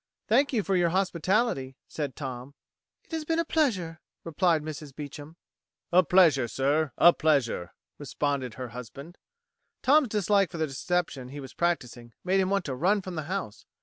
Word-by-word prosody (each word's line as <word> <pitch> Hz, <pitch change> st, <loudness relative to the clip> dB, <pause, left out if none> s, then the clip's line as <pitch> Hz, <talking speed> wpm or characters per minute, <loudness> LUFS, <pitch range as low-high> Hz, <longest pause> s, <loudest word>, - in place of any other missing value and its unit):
"Thank 270 Hz, +6 st, +3 dB
you 225 Hz, -6 st, 0 dB
for 195 Hz, 0 st, 0 dB
your 175 Hz, -2 st, +3 dB
hospitality," 185 Hz, -, 0 dB
said 145 Hz, -4 st, -4 dB
Tom. 130 Hz, 0 st, -7 dB, 0.5 s
"It -, -, -28 dB
has 320 Hz, -1 st, -2 dB
been 325 Hz, +1 st, -1 dB
a 335 Hz, -, +1 dB
pleasure," 190 Hz, -, 0 dB, 0.2 s
replied 165 Hz, -1 st, +1 dB
Mrs. 150 Hz, -2 st, -8 dB
Beecham. 150 Hz, +2 st, -9 dB, 0.5 s
"A 180 Hz, +1 st, +6 dB
pleasure, 160 Hz, -7 st, +4 dB
sir 140 Hz, +4 st, 0 dB
a 175 Hz, -, +7 dB
pleasure," 135 Hz, -, 0 dB, 0.3 s
responded 140 Hz, -4 st, -2 dB
her 125 Hz, 0 st, -6 dB
husband. 130 Hz, +8 st, -10 dB, 0.6 s
Tom's 290 Hz, +1 st, +5 dB
dislike 205 Hz, -2 st, +2 dB
for 170 Hz, -, -8 dB
the 160 Hz, -, +1 dB
deception 145 Hz, -2 st, -2 dB
he 145 Hz, +2 st, -8 dB
was 135 Hz, -2 st, -9 dB
practising 125 Hz, -9 st, -2 dB
made 190 Hz, +2 st, +2 dB
him 190 Hz, -1 st, +1 dB
want 195 Hz, -2 st, 0 dB
to 135 Hz, -, -3 dB
run 190 Hz, +9 st, +1 dB
from 185 Hz, -, -6 dB
the 155 Hz, -3 st, -4 dB
house. 185 Hz, -, -5 dB
160 Hz, 170 wpm, -27 LUFS, 135-190 Hz, 0.6 s, a